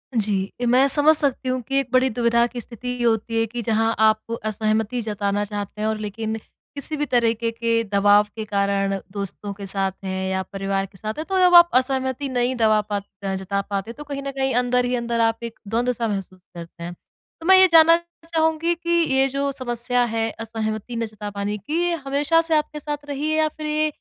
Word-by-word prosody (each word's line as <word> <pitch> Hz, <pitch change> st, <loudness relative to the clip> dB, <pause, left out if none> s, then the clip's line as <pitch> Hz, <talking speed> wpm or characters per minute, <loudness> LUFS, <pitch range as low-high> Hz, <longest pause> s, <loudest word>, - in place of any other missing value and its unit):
जी, 200 Hz, -3 st, 0 dB, 0.2 s
मैं 255 Hz, +3 st, +5 dB
समझ 295 Hz, +3 st, +5 dB
सकती 270 Hz, -3 st, 0 dB
हूँ 255 Hz, 0 st, -1 dB
कि 275 Hz, 0 st, +1 dB
एक 270 Hz, -, -2 dB
बड़ी 260 Hz, 0 st, +3 dB
दुविधा 235 Hz, +1 st, +2 dB
की 240 Hz, 0 st, -7 dB
स्थिति 250 Hz, +2 st, -6 dB
होती 225 Hz, 0 st, +1 dB
है 225 Hz, -, +2 dB
कि 235 Hz, +2 st, -5 dB
जहाँ 225 Hz, 0 st, +1 dB
आप 220 Hz, +1 st, +2 dB
असहमति 215 Hz, +2 st, -1 dB
जताना 205 Hz, -1 st, -1 dB
चाहते 205 Hz, 0 st, -6 dB
हैं 215 Hz, -, 0 dB
और 220 Hz, 0 st, -1 dB
लेकिन 220 Hz, +1 st, -4 dB, 0.4 s
किसी 290 Hz, +2 st, -4 dB
भी 295 Hz, -, 0 dB
तरीके 230 Hz, -2 st, +1 dB
के 230 Hz, 0 st, 0 dB
दबाव 205 Hz, +1 st, +5 dB
के 220 Hz, -1 st, -5 dB
कारण 200 Hz, -1 st, 0 dB
दोस्तों 200 Hz, 0 st, -3 dB
के 200 Hz, 0 st, -9 dB
साथ 195 Hz, 0 st, 0 dB
हैं 190 Hz, 0 st, -3 dB
या 190 Hz, 0 st, -1 dB
परिवार 195 Hz, 0 st, -1 dB
के 190 Hz, 0 st, -17 dB
साथ 215 Hz, +2 st, -4 dB
है 310 Hz, -, -3 dB
तो 380 Hz, +2 st, -1 dB
जब 360 Hz, -1 st, +5 dB
आप 345 Hz, 0 st, +9 dB
असहमति 260 Hz, +1 st, 0 dB
नहीं 250 Hz, 0 st, 0 dB
दबा 215 Hz, -2 st, +3 dB
पात 205 Hz, -1 st, -4 dB, 0.2 s
अ, 195 Hz, -1 st, -2 dB
जता 200 Hz, +1 st, -2 dB
पाते 200 Hz, +3 st, -4 dB
तो 295 Hz, -, -10 dB
कहीं 280 Hz, -1 st, -6 dB
न 275 Hz, -, -4 dB
कहीं 265 Hz, -1 st, -1 dB
अंदर-ही-अंदर 245 Hz, -1 st, 0 dB
आप 225 Hz, +1 st, +1 dB
एक 230 Hz, -1 st, -7 dB
द्वंद-सा 235 Hz, +1 st, -1 dB
महसूस 195 Hz, -2 st, -5 dB, 0.2 s
करते 170 Hz, 0 st, -10 dB
हैं। 175 Hz, +1 st, -5 dB
तो 325 Hz, -, -19 dB
मैं 380 Hz, +1 st, +7 dB
ये 375 Hz, 0 st, +7 dB
जानना 330 Hz, 0 st, +7 dB, 0.3 s
चाहूँगी 325 Hz, +1 st, +1 dB
कि 340 Hz, 0 st, -8 dB, 0.3 s
ये 270 Hz, 0 st, +4 dB
जो 275 Hz, +1 st, -2 dB
समस्या 245 Hz, -1 st, 0 dB
है 225 Hz, 0 st, 0 dB
असहमति 220 Hz, +1 st, -4 dB
ना 230 Hz, 0 st, -1 dB
जता 210 Hz, -1 st, -7 dB
पाने 205 Hz, +1 st, -3 dB
की 305 Hz, -, -2 dB
ये 350 Hz, 0 st, +1 dB
हमेशा 290 Hz, +4 st, +2 dB
से 325 Hz, -1 st, +5 dB
आपके 300 Hz, 0 st, -1 dB
साथ 295 Hz, 0 st, -5 dB
रही 290 Hz, +2 st, -2 dB
है 310 Hz, -, +1 dB
या 310 Hz, 0 st, +3 dB
फ़िर 305 Hz, 0 st, -7 dB
ये 305 Hz, 0 st, +1 dB
230 Hz, 210 wpm, -22 LUFS, 210-275 Hz, 0.4 s, आप